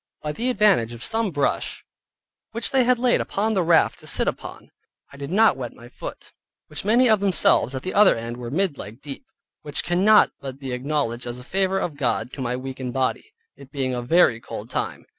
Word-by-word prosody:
By 150 - -2
the 235 +10 -2
advantage 200 - +3
of 120 0 -8
some 225 -1 0
brush 145 -5 -1 0.7
which 230 0 -1
they 265 -2 +3
had 250 0 +3
laid 245 0 +2
upon 215 +3 -1
the 190 - +2
raft 165 -1 +3
to - - -12
sit - - +1
upon, - - -6 0.4
I - - -12
did 140 0 -6
not 210 -2 +4
wet 125 -3 -6
my 120 +1 -14
foot - - -9 0.4
(which 155 - -5
many 235 +5 +4
of 220 -3 +4
themselves 185 - +2
at 130 - -5
the 185 - -4
other 205 -1 +6
end 115 +1 -6
were 120 -1 -6
mid 165 +1 -1
leg 110 +4 -9
deep) 145 - -9 0.3
which 145 0 -2
cannot 195 +5 +4
but 135 -1 -7
be 135 -2 -6
acknowledged 125 -2 -2
as 120 0 -5
a 125 - -10
favor 190 +5 0
of 170 -6 -3
God 125 -3 -1
to 140 - -6
my 125 0 -1
weakened 130 -1 -6
body, 130 - -1 0.3
it 140 - -15
being 130 -2 -2
a 125 - -2
very 125 -2 +3
cold - - -8
time. - - -3
145 Hz, 215 wpm, -23 LUFS, 125-200 Hz, 0.7 s, other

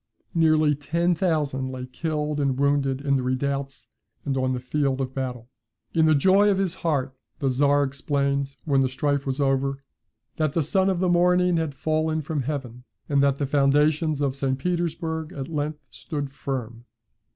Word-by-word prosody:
Nearly 155 -2 +4
ten 170 +5 0
thousand 150 -7 0
lay 130 -1 -5
killed 150 +2 -3
and 135 -2 0
wounded 140 -1 +1
in 140 -1 +1
the - - -1
redoubts 135 +2 -2 0.4
and 135 - -1
on 130 -1 0
the 125 - -2
field 135 +1 -1
of 130 -1 -3
battle. 125 -3 -4 0.5
In 160 -1 +4
the 155 -1 +5
joy 190 +7 +5
of 195 - +2
his 190 -3 0
heart 140 -5 -1 0.2
the 135 -2 0
Czar 145 +2 +3
exclaimed, 140 0 -1
when 140 -3 +3
the 130 - +1
strife 140 +1 -1
was 135 +1 -2
over, 135 0 0 0.5
"That 155 -3 0
the 165 - +1
son 190 +5 +2
of 185 -2 0
the 185 - +2
morning 180 0 +3
had 160 -4 -2
fallen 155 +1 0
from 150 -1 -2
heaven; 125 -3 -5 0.2
and 140 -1 +2
that 140 -1 +3
the 140 - -2
foundations 145 +2 +2
of 135 -2 0
St. 135 -1 -1
Petersburg 165 0 -2
at 135 -5 -5
length 150 -1 -4
stood 145 -3 -5
firm." 120 -4 -5
145 Hz, 175 wpm, -25 LUFS, 135-160 Hz, 0.5 s, the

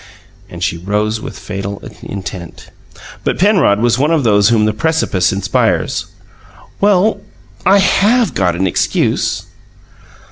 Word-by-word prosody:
And - - -7
she 85 - -1
rose 105 +4 -2
with - - -8
fatal 100 0 -6 0.2
intent. 95 -3 -8 0.5
But - - -1
Penrod 185 - +3
was 120 +1 +2
one 145 +3 +2
of 160 -4 +1
those 105 -2 +4
whom 110 -2 +3
the 110 - +1
precipice 110 - 0
inspires. 100 +1 0 0.7
"Well, 205 +1 +2 0.5
I 195 +2 +6
HAVE 205 +3 +2
got 90 -3 0
an 95 +2 0
excuse." 95 - 0
110 Hz, 130 wpm, -15 LUFS, -, 0.7 s, I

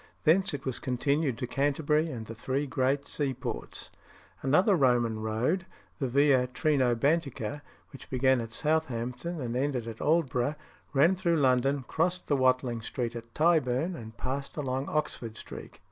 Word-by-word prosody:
Thence 180 +4 +4
it 140 - -8
was 130 -2 -2
continued 135 +1 0
to - - -3
Canterbury 145 +4 +1
and 115 -6 -6
the 115 - -7
three 130 +5 -2
great 135 +1 0
seaports. 135 -4 -4 0.5
Another 180 +9 +4
Roman 120 -6 +2
road, 115 - -1 0.3
the 135 - 0
Via 135 0 +4
Trinobantica, 140 0 +1 0.3
which 135 - -11
began 130 -1 +3
at 115 0 -7
Southampton 150 +2 -1
and 120 -3 -3
ended 130 -3 -1
at 115 -1 -7
Aldborough, 145 -4 +1 0.4
ran 155 +7 +4
through 175 -3 +1
London, 135 0 +2
crossed 180 +3 0
the 145 - +2
Watling 130 -3 +2
Street 120 +1 -3
at 115 0 -8
Tyburn, 160 0 +2
and 110 -5 -10
passed 135 +4 -4
along 135 -1 -2
Oxford 115 -7 -2
Street. - - -9
135 Hz, 145 wpm, -29 LUFS, 125-150 Hz, 0.5 s, Thence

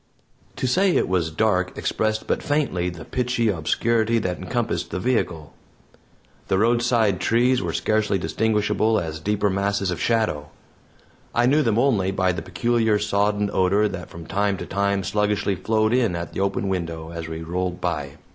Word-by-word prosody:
To - - -3
say 185 +9 +3
it - - +2
was 90 -3 0
dark 90 +1 0
expressed 110 0 -1
but - - -1
faintly 135 -12 0
the 80 -3 -9
pitchy 125 -2 0
obscurity 110 +6 +1
that 90 -5 -2
encompassed 95 -5 -2
the - - -3
vehicle. 90 -9 -1 0.9
The 95 - +1
roadside 115 -2 +2
trees 125 +4 +2
were - - -2
scarcely 110 -2 +1
distinguishable 110 +5 +1
as 80 -1 -5
deeper 105 +3 0
masses 100 -1 0
of 85 - -4
shadow; 105 -11 0 0.9
I 120 - +3
knew 145 +5 +4
them 115 -6 +1
only 115 -7 +2
by 95 -1 +1
the 90 - -4
peculiar 115 -3 +1
sodden 105 0 0
odor 100 +3 +3
that 90 -4 -7
from 85 -1 -10
time 100 +2 0
to - - -6
time 100 0 0
sluggishly 105 0 0
flowed 110 +3 +1
in 120 -8 +2
at 85 0 -5
the - - -4
open 100 0 0
window 85 -3 -3
as 85 -1 -6
we 80 0 -6
rolled 90 +1 -3
by. 75 -6 -3
100 Hz, 165 wpm, -23 LUFS, 90-110 Hz, 0.9 s, knew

